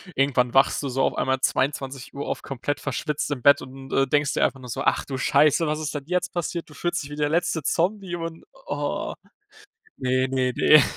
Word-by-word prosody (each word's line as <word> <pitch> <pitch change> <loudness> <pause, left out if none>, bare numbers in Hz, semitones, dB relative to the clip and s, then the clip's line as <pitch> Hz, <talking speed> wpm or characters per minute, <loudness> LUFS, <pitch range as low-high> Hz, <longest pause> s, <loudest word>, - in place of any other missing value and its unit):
Irgendwann 130 -3 +2
wachst 135 +2 +4
du 140 - -2
so 135 +1 0
auf - - +1
einmal 130 0 +1
22:00 135 0 -1
auf, - - -3
komplett 135 +2 -3
verschwitzt 150 -1 -2
im 135 -4 -2
Bett 140 +3 +6
und, 135 +1 -10
äh, 135 0 +3
denkst 145 0 +2
dir - - +3
einfach 135 - -2
nur 125 - -10
so: 135 +4 -3
„Ach - - +2
du 135 - -4
scheiße, 150 +5 +3
was 150 0 -1
ist 155 -1 -3
denn 140 -2 -4
jetzt 180 +1 -1
passiert?“ 170 -1 -3
Du - - -13
fühlst 175 +1 -2
dich 140 - -9
wie 145 - -6
der 145 -1 +1
letzte 165 0 +1
Zombie 185 +4 0
und 165 -1 -6 0.2
ah, 145 0 -2 0.8
ne, 130 0 +1
ne, 130 -1 0
ne. 150 -2 +7
140 Hz, 215 wpm, -24 LUFS, 130-155 Hz, 0.8 s, ne